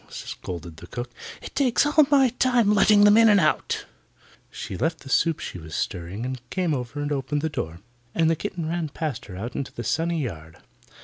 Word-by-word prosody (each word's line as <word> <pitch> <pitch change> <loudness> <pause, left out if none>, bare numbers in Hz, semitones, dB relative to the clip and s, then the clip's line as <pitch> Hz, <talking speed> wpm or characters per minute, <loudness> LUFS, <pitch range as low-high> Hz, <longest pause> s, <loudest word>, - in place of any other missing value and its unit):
scolded 85 -2 -7
the - - -11
cook. 120 0 -6 0.3
"It - - -8
takes 265 -1 +3
all 295 -1 +5
my 275 -3 +5
time 245 -3 +3
letting 210 0 +6
them 205 +1 +7
in 225 -1 +7
and 205 -1 +6
out." 155 - +1 0.6
She - - -6
left 160 - -1
the 135 - -11
soup 165 +2 +2
she 90 - -6
was 80 -1 -8
stirring 90 +6 -3
and 130 -1 -4
came 180 -4 0
over 125 +1 -4
and 145 - -3
opened 145 +1 -1
the 160 - +1
door, 85 - -5 0.3
and 165 -1 +3
the 165 - +3
kitten 175 -3 -4
ran 165 -1 -2
past 150 -4 -4
her 95 - -9
out 115 +5 -5
into 140 - -3
the 120 - -6
sunny 165 +1 0
yard. 80 -9 -7
155 Hz, 205 wpm, -25 LUFS, -, 0.6 s, them